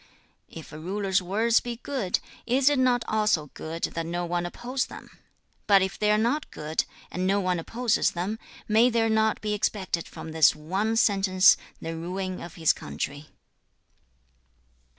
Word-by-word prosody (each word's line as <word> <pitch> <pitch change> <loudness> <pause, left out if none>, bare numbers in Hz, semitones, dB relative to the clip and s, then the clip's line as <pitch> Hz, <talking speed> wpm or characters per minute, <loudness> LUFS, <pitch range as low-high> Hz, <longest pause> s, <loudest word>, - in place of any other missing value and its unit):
5. - - -13
'If 160 - -10
a 155 - -7
ruler's 195 +3 0
words 220 +6 +2
be 240 -1 -5
good, 240 -6 -2 0.3
is 260 +3 +4
it 290 -2 +1
not 250 -2 +2
also 210 -9 +1
good 165 +1 -7
that 165 - -1
no 175 +1 -2
one 175 0 -1
oppose 250 +8 -3
them? - - -11 0.6
But 200 -2 +6
if 190 0 -4
they 210 - +2
are 210 - +4
not 245 +8 0
good, 155 +1 -2 0.3
and 185 +2 -1
no 200 +1 +2
one 185 -2 0
opposes 230 +7 +1
them, 190 +6 -3 0.3
may 225 +3 +5
there 225 -1 +1
not 220 0 +2
be 210 -1 -1
expected 195 -4 -1
from 160 - -9
this 160 -1 +5
one 190 +9 -1
sentence 195 -3 +5 0.2
the 165 0 -5
ruin 185 +3 -4
of 175 +2 -9
his 160 -4 +3
country?' 145 +2 -6
195 Hz, 170 wpm, -26 LUFS, 175-225 Hz, 0.6 s, But